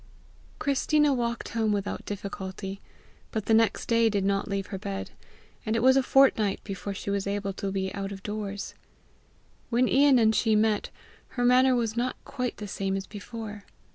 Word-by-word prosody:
Christina 295 +1 +2
walked 235 -2 -2
home 220 -2 0
without 205 -1 -2
difficulty, 195 -1 -6 0.5
but 220 -2 -3
the 225 - +2
next 225 0 +3
day 230 -1 +3
did 200 -2 0
not 195 0 0
leave 200 -1 -2
her 190 - -3
bed, 195 -1 -5 0.5
and 220 -1 -1
it 230 - +1
was 260 +1 +6
a 270 - +5
fortnight 255 -7 +3
before 200 0 -5
she 200 - -4
was 200 0 -1
able 200 0 -2
to 195 0 -4
be 190 -1 -2
out 200 -1 -4
of 195 -1 -8
doors. 205 -1 -4 1.0
When 245 +1 +3
Ian 275 0 +5
and 220 -2 +4
she 220 -1 +2
met, 215 -1 +2 0.5
her 245 - +2
manner 255 +1 +5
was 230 -2 -1
not 245 +2 -1
quite 250 -1 -3
the 210 - -6
same 195 0 -2
as 195 - -5
before. 210 0 -8
215 Hz, 180 wpm, -27 LUFS, 200-235 Hz, 1.0 s, was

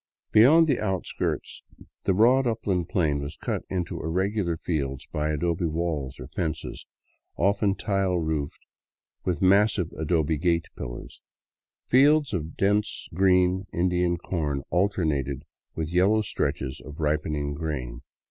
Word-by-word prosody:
Beyond 145 +10 +7
the 140 -6 +1
outskirts 95 -4 -3 0.4
the 95 - +3
broad 125 +5 +5
upland 95 -6 -1
plain 75 -6 +1
was 70 +2 -6
cut - - -2
into 90 -2 -3
ir 80 - -3
regular 95 -1 0
fields 70 -6 -3
by 75 0 -2
adobe 85 +2 0
walls 80 -5 -3
or - - -7
fences, 80 -3 -4 0.5
often 100 +1 +2
tile 95 -3 0
roofed, 80 -3 -3 0.6
with 90 -2 -1
massive 100 -2 +3
adobe 80 -1 0
gate 85 0 +1
pillars. - - -8 0.6
Fields 145 +1 +4 0.2
dense 105 +2 0
with 80 - -9
green 95 0 +3
Indian 90 0 +1
corn 75 -6 -2
alternated 80 - 0 0.3
with 80 0 -3
yellow 100 +5 +4
stretches 65 -8 -2
of 75 +1 -10
ripening 75 -1 -1
grain. 65 -5 -4
85 Hz, 130 wpm, -26 LUFS, 75-100 Hz, 0.6 s, Beyond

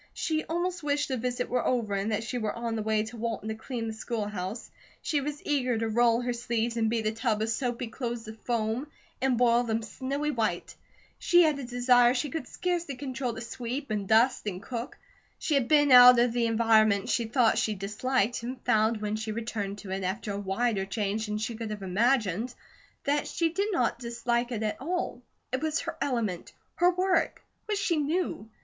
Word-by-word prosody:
She 315 -1 -1
almost 350 +2 -2
wished 290 -1 0
the 260 - -1
visit 245 +1 -2
were 250 -1 0
over, 235 -5 0
and 200 +2 -1
that 215 +1 -1
she 245 +2 -3
were 215 -2 -1
on 235 -1 -3
the 220 - -2
way 215 0 +1
to 220 +2 -8
Walton 225 -1 -3
to - - -1
clean 230 +1 -5
the 220 - -3
school 220 -1 -3
house. 205 +2 -5 0.3
She 295 -2 0
was 290 +1 -5
eager 255 -5 +1
to 225 0 -1
roll 235 +1 +3
her 245 0 -1
sleeves 235 0 -1
and 225 -1 +1
beat 225 -1 -1
a 215 - +2
tub 225 -1 0
of 225 - -1
soapy 240 +1 -1
clothes 235 0 -4
to 220 - -8
foam, 225 +3 -2 0.3
and 260 -2 +2
boil 240 0 +4
them 225 -1 -1
snowy 280 +6 -3
white. 215 -9 -2 0.4
She 350 0 +5
had 305 -3 +2
a - - -5
desire 245 0 +4
she 265 +2 -1
could 320 - -4
scarcely 345 -5 -2
control 255 -2 -3
to 225 - -6
sweep, 240 +2 -5
and 205 -2 -2
dust, 225 +2 +3
and 185 -3 -3
cook. 240 +5 -6 0.4
She 310 - -1
had 275 -4 +2
been 290 -1 +4
out 250 0 +10
of 240 0 +3
the 235 -1 +1
environment 220 -3 +3
she 235 - +1
thought 235 0 +3
she 215 - 0
disliked 215 +4 -1
and 250 +2 -5
found 220 0 +2
when 210 0 -1
she 220 0 -3
returned 215 -3 -4
to 195 -2 -8
it 190 0 -2
after 200 +3 -2
a 200 - -3
wider 205 +1 0
change 210 +1 -2
than 210 0 -2
she 225 +2 -3
could 225 -1 -5
have 210 -2 -5
imagined, 220 +2 +1 0.5
that 290 +1 0
she 330 -1 0
did 400 +6 -1
not 250 - +1
dislike 240 0 -1
it 220 -2 -2
at 215 +2 -2
all. 345 -4 -2 0.3
It 260 - 0
was 315 0 0
her - - -5
element, 225 -10 -2 0.2
her 355 - +5
work, 370 +1 +1 0.2
what 420 -1 0
she 365 -5 +1
knew. 300 - -1
235 Hz, 210 wpm, -28 LUFS, 220-260 Hz, 0.5 s, out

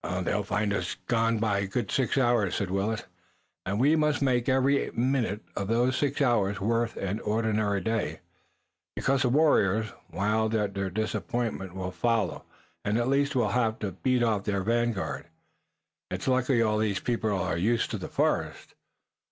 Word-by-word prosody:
"They'll 105 +4 0
find 100 +1 -1
us 90 -3 -2
gone 115 -1 +2
by 105 -2 +1
a 100 - -1
good 105 0 -2
six 130 0 +1
hours," 120 -7 +2
said 100 -3 -2
Willet, 100 +3 -1 0.6
"and 100 +2 -1
we 145 +5 +4
must 150 -1 +2
make 130 -2 +1
every 135 +2 +2
minute 120 -4 0
of 100 - -2
those 120 +4 +2
six 145 0 0
hours 105 -6 +2
worth 115 +3 0
an 100 +3 -2
ordinary 105 -2 0
day, 110 +3 -2 0.7
because 135 0 +1
the 125 - +2
warriors, 110 -7 +3 0.2
wild 110 +4 0
at 105 -2 0
their 100 -1 -2
disappointment, 110 -1 -3
will 90 -1 -4
follow, 115 +2 0 0.4
and 105 +1 0
at 120 +2 0
least 140 +1 +1
we'll 120 -4 +2
have 110 0 +1
to 100 -3 -3
beat 125 +6 +1
off 110 -4 +1
their 100 -2 0
vanguard. 110 - -1 0.8
It's - - -4
lucky 130 -2 +3
all 105 -1 +1
these 105 -3 0
people 115 -3 -1
are 90 -2 -1
used 110 +8 +1
to - - -3
the - - -6
forest." - - -1
110 Hz, 170 wpm, -28 LUFS, 100-120 Hz, 0.8 s, we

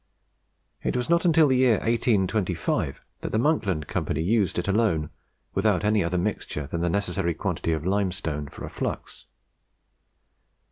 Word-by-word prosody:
It - - -1
was 125 +6 -2
not 170 +1 +3
until 160 -2 +5
the 130 -2 +3
year 125 -3 +5
1825 105 - 0 0.2
that - - -5
the - - +1
Monkland 105 - +1
Company 80 - -2
used 105 +1 +1
it 90 - -1
alone, 100 -7 +1 0.4
without 100 0 +2
any 105 -1 +3
other 85 +2 -1
mixture 75 -4 -2
than 85 +4 -4
the 85 - +1
necessary 90 -3 0
quantity 80 - -2
of 80 -1 -1
limestone 90 -6 -1
for - - -8
a - - -7
flux. - - -5
100 Hz, 150 wpm, -26 LUFS, 85-115 Hz, 0.4 s, until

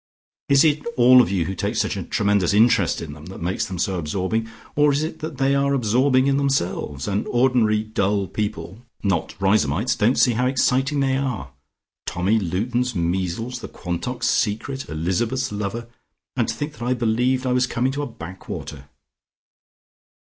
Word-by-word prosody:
Is 140 0 +6
it 150 -2 +2
all 125 +1 +8
of 120 - 0
you 90 -4 0
who 95 - -3
take 95 - -2
such - - 0
a - - -3
tremendous 100 -2 +1
interest 115 +3 +3
in 75 - -7
them 75 +2 -12
that 95 - -9
makes 90 +3 -2
them 95 - -5
so 95 +1 -1
absorbing, 95 +8 -2 0.3
or 150 0 +4
is 145 +2 0
it 160 0 -5
that 155 -2 -6
they 135 0 +2
are 140 0 +2
absorbing 130 +2 +3
in 140 0 +2
themselves, 90 - -1
and 100 +1 -1
ordinary 120 -4 +2
dull 100 -2 0
people, 105 +1 -5 0.2
not 95 -6 -1
Riseholmites, 100 - +2
don't 115 +4 +2
see 125 - +5
how 125 +3 +1
exciting 135 +2 +1
they 135 -1 +1
are? 120 - -3 0.6
Tommy 95 +5 +1
Luton's 120 +7 -1
measles: 95 +8 -2
the - - -7
Quantocks' 95 +8 -4
secret: 120 +5 -1
Elizabeth's 110 +11 -1
lover! 105 +3 -4 0.5
And - - +1
to - - -1
think 145 +1 -4
that 115 - -16
I 125 +2 0
believed 125 +3 +1
I 130 - +1
was 125 0 +2
coming 125 +3 0
to 140 +2 -3
a 145 - -3
backwater." 85 - -8
115 Hz, 175 wpm, -22 LUFS, 95-130 Hz, 0.6 s, all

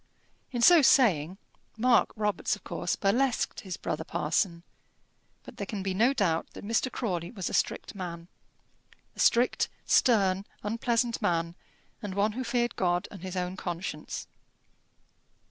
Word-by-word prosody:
In 240 -2 -1
so 345 +2 +8
saying 190 - +4 0.4
Mark 245 +1 +4
Robarts 210 -2 0
of - - -17
course - - -2
burlesqued 240 +6 +1
his 190 -2 -6
brother - - -3
parson; 170 -5 -1 0.8
but - - -12
there - - -4
can 210 -6 -4
be 190 -1 -1
no 230 +7 +3
doubt 185 -11 0
that - - -9
Mr. 230 +4 0
Crawley 175 -8 -3
was 195 -7 -4
a - - -8
strict - - -1
man, 170 -3 -6 0.9
a - - -15
strict, 240 +2 +3 0.2
stern, 195 -5 +3 0.2
unpleasant 230 +2 0
man, 170 -1 0 0.5
and 200 -3 -5
one 205 +2 +2
who 255 +4 -4
feared 240 -1 0
God 175 -1 0
and 195 - -10
his 185 0 -5
own 180 0 -2
conscience. 175 -4 -5
200 Hz, 145 wpm, -28 LUFS, 180-235 Hz, 0.9 s, so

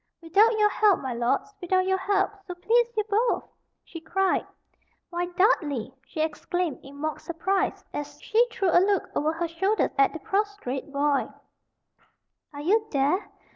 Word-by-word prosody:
"Without 405 +7 +3
your 420 -1 +4
help, 420 -4 +4
my 260 -2 -3
lords 240 - -1
without 370 +1 +1
your 380 0 +1
help, 390 +1 +1 0.2
so 360 - -5
please 460 +6 +2
you 430 - +2
both," 445 +3 +1 0.4
she 330 - -10
cried. 380 +4 0 0.6
"Why, 350 0 -2
Dudley," 340 - +1
she 310 - -4
exclaimed, 335 0 -2
in 275 +1 -13
mock 310 +2 -3
surprise, 370 +4 -1
as 295 0 -6
she 455 +1 +3
threw 390 -6 0
a 350 - +6
look 395 -1 +1
over 305 +2 +1
her 335 +1 -2
shoulder 385 +6 0
at 275 - +5
the 320 - -7
prostrate 390 - -2
boy, 285 0 +1 1.2
"are 285 -1 -8
you 415 +8 +3
there? 290 +8 +1
355 Hz, 160 wpm, -26 LUFS, 305-405 Hz, 1.2 s, a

